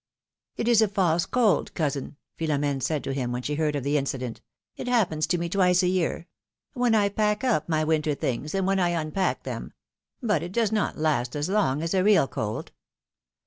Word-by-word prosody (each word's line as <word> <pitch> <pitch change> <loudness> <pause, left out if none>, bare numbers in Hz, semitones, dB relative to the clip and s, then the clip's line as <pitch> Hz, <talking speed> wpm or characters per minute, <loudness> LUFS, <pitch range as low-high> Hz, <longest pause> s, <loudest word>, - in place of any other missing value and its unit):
It 230 - -2
is 235 -2 +5
a 220 - +4
false 175 -4 +1
cold, 225 -9 +1
cousin,'^ 145 -3 -2 0.2
Philom^ne 145 -3 0
said 150 +1 -1
to 135 - -3
him 125 -3 -2
when 125 +1 -3
she 150 - -2
heard 150 0 0
of 140 - -2
the 145 +2 +1
incident; 130 -4 -3 0.3
it - - -6
happens 190 -11 +1
to 175 - +1
me 170 0 -2
twice 180 0 +3
a - - +3
year 180 -2 0 0.2
' - - -66
— - - -67
when 245 -4 +2
I 205 -2 +4
pack 210 +2 0
up 215 - +1
my 155 -1 +1
winter 155 -1 +1
things, 140 +6 -3
and 195 -1 +1
when 195 0 +2
I 175 -2 +1
unpack 160 +5 -1
them; - - -6 0.5
but 225 -5 +1
it 175 +2 -6
does 225 -1 +1
not 215 -2 0
last 150 -6 0
as 145 +4 -2
long 165 -8 +1
as 165 - -2
a 185 -1 +2
real 200 -9 +5
cold. 110 -3 -4
165 Hz, 215 wpm, -26 LUFS, 145-200 Hz, 0.5 s, is